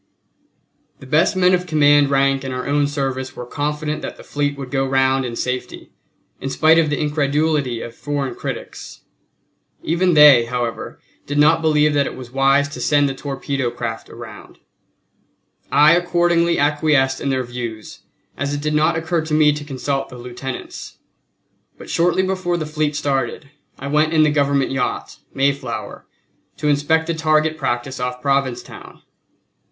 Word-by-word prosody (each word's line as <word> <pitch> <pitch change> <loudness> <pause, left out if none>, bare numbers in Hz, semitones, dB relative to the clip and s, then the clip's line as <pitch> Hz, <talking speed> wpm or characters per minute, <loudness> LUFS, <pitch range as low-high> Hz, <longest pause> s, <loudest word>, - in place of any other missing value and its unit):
The - - -13
best 155 +8 +2
men 185 0 +3
of 180 0 0
command 145 -3 +4
rank 135 0 +2
in 135 - -4
our 125 0 -4
own 145 0 +2
service 135 -2 -3
were 125 - -7
confident 150 +3 -3
that - - -6
the - - -12
fleet 145 -1 -2
would 135 -2 -7
go 135 -1 +1
round 135 0 +1
in 120 -1 -5
safety, 125 +1 -4 0.5
in 135 - -4
spite 160 +4 +4
of 155 -2 +2
the 145 - -1
incredulity 150 -4 0
of 115 - -8
foreign 145 0 -3
critics. - - -7 0.8
Even 175 +1 +1
they, 145 -6 +8
however, 120 -1 -4 0.3
did 145 - -3
not 155 +2 +4
believe 150 -1 +3
that 145 -2 +2
it - - -6
was 125 -2 -10
wise 135 +2 +3
to - - -8
send 145 -1 +3
the 135 - -2
torpedo 135 -2 -3
craft 115 -2 -6
around. - - -11 1.1
I 150 +2 +6
accordingly 175 -1 +2
acquiesced 145 -2 +2
in 140 - -1
their 130 -1 0
views, 120 -3 -7 0.4
as 145 +1 -2
it 145 - -4
did 150 0 -1
not 155 +2 +2
occur 165 +1 -1
to 155 -1 -1
me 150 -1 +5
to 150 0 -6
consult 135 -1 -3
the 125 - -11
lieutenants. 125 +2 -8 0.8
But - - -10
shortly 175 +2 +2
before 185 -2 -1
the 160 - -3
fleet 150 -1 -2
started, 140 0 -2 0.3
I 135 - -8
went 150 +3 +1
in 155 -1 +5
the 150 - +3
Government 140 -2 +1
yacht 135 -1 -3 0.2
Mayflower 140 +1 -2 0.5
to 150 +1 -1
inspect 145 +3 +2
the 170 - -1
target 155 0 +1
practice 130 -2 -3
off 125 0 -3
Provincetown. 135 -2 -3
145 Hz, 165 wpm, -20 LUFS, 135-155 Hz, 1.1 s, they